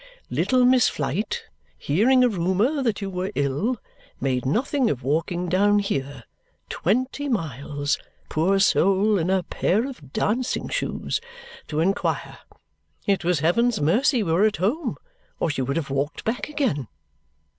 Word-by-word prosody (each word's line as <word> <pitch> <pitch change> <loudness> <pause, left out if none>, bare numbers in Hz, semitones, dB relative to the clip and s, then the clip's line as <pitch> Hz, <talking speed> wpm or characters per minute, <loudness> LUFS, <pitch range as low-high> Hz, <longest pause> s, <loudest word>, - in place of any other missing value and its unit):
Little 255 -1 +3
Miss 250 -1 +5
Flite, 155 +9 -2 0.3
hearing 245 - +3
a - - +6
rumour 205 - +1
that 230 -5 0
you 195 - -3
were 185 +1 -3
ill, 145 - 0 0.4
made 130 -1 -1
nothing 255 - +1
of 130 -2 -3
walking 165 +5 -1
down 200 +4 +3
here 140 - -2 0.5
twenty 255 - -1
miles, 145 - -2 0.3
poor 180 +6 +2
soul, 195 +2 +3
in 170 +2 -1
a 190 -1 +2
pair 215 +9 0
of 155 - -10
dancing 240 - -1
shoes - - -2 0.5
to 155 0 -1
inquire. 195 +4 -1 0.7
It 200 -4 +1
was 170 -3 +1
heaven's 230 +8 +2
mercy 225 - +3
we 165 - -1
were 190 +6 +4
at 215 -1 +1
home, 235 - -1 0.4
or 165 - +1
she 140 - -2
would 140 +3 -1
have 145 -4 -3
walked 140 +2 -2
back 235 +6 -2
again." 240 - -1
190 Hz, 145 wpm, -24 LUFS, 150-235 Hz, 0.7 s, a